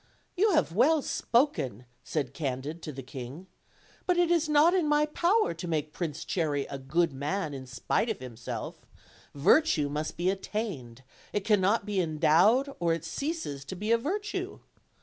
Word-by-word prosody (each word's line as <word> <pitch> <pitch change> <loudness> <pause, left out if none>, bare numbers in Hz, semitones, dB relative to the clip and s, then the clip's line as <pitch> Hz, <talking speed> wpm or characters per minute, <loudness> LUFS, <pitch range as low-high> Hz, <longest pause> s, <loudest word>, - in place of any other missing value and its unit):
"You 405 +2 +3
have 305 - +3
Avell 270 - +3
spoken," 185 - 0 0.2
said 140 -5 -2
Candid 140 +3 -4
to 155 - -6
the 135 -1 -8
king; 130 +6 -8 0.6
"but 360 -1 +3
it 350 -1 +3
is 330 -3 +2
not 300 +4 +5
in 360 -5 +2
my 295 0 +3
power 350 - +2
to 170 +2 -7
make 155 -2 -2
Prince 160 -3 -4
Cherry 150 -6 -1
a 140 - -4
good 155 +4 +1
man 150 +4 -2
in 130 -1 -7
spite 130 - -1
of 220 - -2
himself: 125 -2 -7 0.5
virtue 155 - +4
must 150 +2 -3
be 180 +2 +2
attained; 190 - -5 0.3
it 205 - -1
can 210 -3 +4
not 200 +3 +2
be 205 -3 0
endowed 180 - +3
or 170 -1 +2
it 165 0 -4
ceases 275 - -4
to 190 - -6
be 210 +5 -2
a 230 - +6
virtue. 405 - -3
175 Hz, 170 wpm, -29 LUFS, -, 0.6 s, a